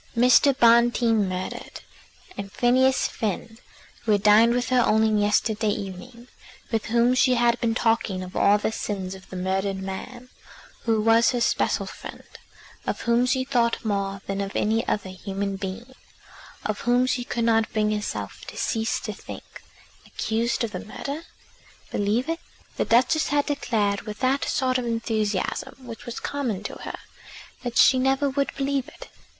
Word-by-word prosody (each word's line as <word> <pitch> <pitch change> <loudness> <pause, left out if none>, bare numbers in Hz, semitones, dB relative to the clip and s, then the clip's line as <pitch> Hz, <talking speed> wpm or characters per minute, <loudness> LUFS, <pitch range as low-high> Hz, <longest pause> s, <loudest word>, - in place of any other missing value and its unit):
Mr. 250 +3 +6
Bonteen 235 -3 +4
murdered, 185 0 -5 0.5
and 200 -1 -6
Phineas 260 +3 +3
Finn, 225 +2 -4 0.4
who 220 -3 +1
had 205 -1 +1
dined 225 +3 +6
with 245 0 -1
her 255 -1 +3
only 220 0 +3
yesterday 210 +1 +1
evening, 205 +5 -6 0.4
with 225 -2 0
whom 235 +2 +3
she 255 0 +4
had 240 0 +2
been 225 -1 +1
talking 225 -5 +1
of 185 +1 -10
all 205 +1 +4
the 210 - -1
sins 190 -4 -4
of 190 -1 -13
the - - -8
murdered 190 +1 -1
man, 240 +7 -7 0.6
who 225 -2 +2
was 225 +2 +4
her 245 - 0
special 235 - +1
friend, - - -9 0.6
of - - -2
whom 235 +1 +2
she 260 0 +1
thought 240 -4 0
more 195 -2 -1
than 195 0 -2
of 195 0 -5
any 225 +2 +1
other 200 -3 -1
human 195 +1 -4
being, 200 +7 -6 0.7
of 215 -1 -2
whom 245 +1 +2
she 250 -1 -1
could 235 -1 -2
not 225 -1 +2
bring 215 -1 +1
herself 210 -1 -4
to - - -9
cease 225 -1 0
to - - -5
think, - - -11 0.5
accused 230 +2 -1
of 230 - -2
the - - -4
murder! 285 +8 -6 0.7
Believe 210 +6 0
it! 330 +1 -2 0.4
The - - +1
Duchess 255 +7 +3
had 290 0 +1
declared 215 -8 0
with 210 -1 -7
that 265 +2 +1
sort 255 -2 +1
of 245 - -4
enthusiasm 220 -4 -2
which 230 -1 -9
was 240 - -5
common 245 -9 -3
to - - -5
her, - - -6 0.6
that 245 -1 -4
she 260 - +6
never 270 +2 +2
would 280 +1 0
believe 275 -1 -1
it. - - -12
230 Hz, 165 wpm, -25 LUFS, 205-250 Hz, 0.7 s, Mr